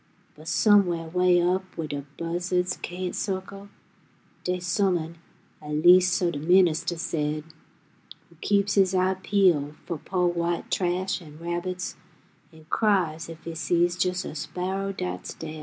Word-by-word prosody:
But 155 +1 -14
somewheh 175 -7 +3
way 180 -1 +4
up 180 +2 +2 0.2
wheh 165 - -2
de 145 -2 -4
buzza'ds 180 +2 -1
cain't 180 0 -4
circle, 195 +1 -4 0.7
Dey's 180 0 -2
Some'n, 170 -3 0 0.4
at 150 0 -4
leas' 180 +3 +6
so 175 -1 +1
de 145 - -5
ministuh 175 0 +3
said, 155 -2 -2 0.8
Who 170 - -22
keeps 200 0 +2
His 190 -2 +3
eye 185 +1 +2
peeled 170 -8 +2
fo' 170 - -3
po' 180 -1 0
white 170 -1 -1
trash 185 +1 0
'n' 150 -3 -13
rabbits, 175 +2 -4 0.5
An' 160 -1 -17
cries 175 -7 +1
ef 165 0 -10
He 165 - -6
sees 175 +1 +1
jes' 180 0 -2
a - - -6
sparrow 180 +6 -3
'ats 90 0 -4
daid. 155 -1 -7
175 Hz, 145 wpm, -26 LUFS, 165-185 Hz, 0.8 s, leas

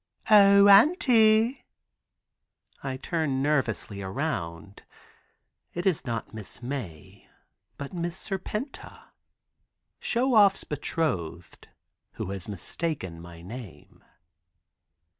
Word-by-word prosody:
"O 200 -1 +8
auntie!" 225 - +5 1.2
I 135 -1 -4
turn 140 -3 -1
nervously 120 -8 -1
around. 95 - -4 0.9
It 175 - -3
is 180 -7 +1
not 115 -3 -4
Miss 110 -3 -8
Mae 120 - -7 0.5
but 140 +3 -7
Miss 175 -1 -3
Serpenta. 210 +7 -6 0.9
Show 250 +2 0
Off's 200 -3 +5
betrothed, 115 - -3 0.5
who 95 - -5
has 95 -3 -6
mistaken 100 - -5
my 85 -1 -12
name. 95 - -11
140 Hz, 85 wpm, -27 LUFS, -, 1.2 s, O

